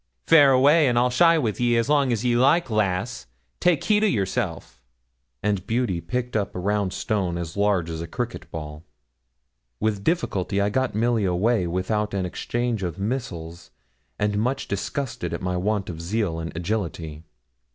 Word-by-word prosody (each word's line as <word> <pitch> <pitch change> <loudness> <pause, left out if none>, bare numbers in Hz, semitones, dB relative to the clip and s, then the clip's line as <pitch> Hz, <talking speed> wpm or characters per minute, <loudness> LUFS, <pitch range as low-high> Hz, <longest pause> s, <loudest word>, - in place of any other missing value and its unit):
'Faire 145 -4 +7
away; 140 +3 +5
I'll 120 +1 +2
shy 165 +6 +5
wi' 115 -8 0
ye 120 -1 +2
as 115 - +1
long 140 -3 +3
as 115 0 -1
ye 120 -1 +3
like, 135 +3 +3
lass; 100 - -1 0.3
take 175 -5 +2
heed 210 0 +3
o' - - +5
yerself;' 95 - -2 0.6
and 100 -2 -1
Beauty 115 -7 0
picked 125 +2 -3
up 100 -2 -1
a - - -3
round 100 0 0
stone 95 -3 -1
as 85 -1 -5
large 100 -4 +1
as 80 -1 -5
a 85 - -5
cricket 120 +7 -5
ball. 75 -1 -7 1.0
With 105 -2 -1
difficulty 100 - 0
I 100 +1 +1
got 130 -1 0
Milly 115 -1 +1
away 95 +2 +1
without 100 +4 -1
an 95 -2 -1
exchange 120 +4 -2
of 90 -2 -3
missiles, 95 -7 -4 0.5
and 105 -1 0
much 125 +5 -1
disgusted 125 +7 -3
at - - -7
my 90 0 -1
want 100 +2 -1
of 80 -2 -6
zeal 90 -2 -1
and 80 0 -5
agility. 85 -5 -3
105 Hz, 170 wpm, -24 LUFS, 90-125 Hz, 1.0 s, Faire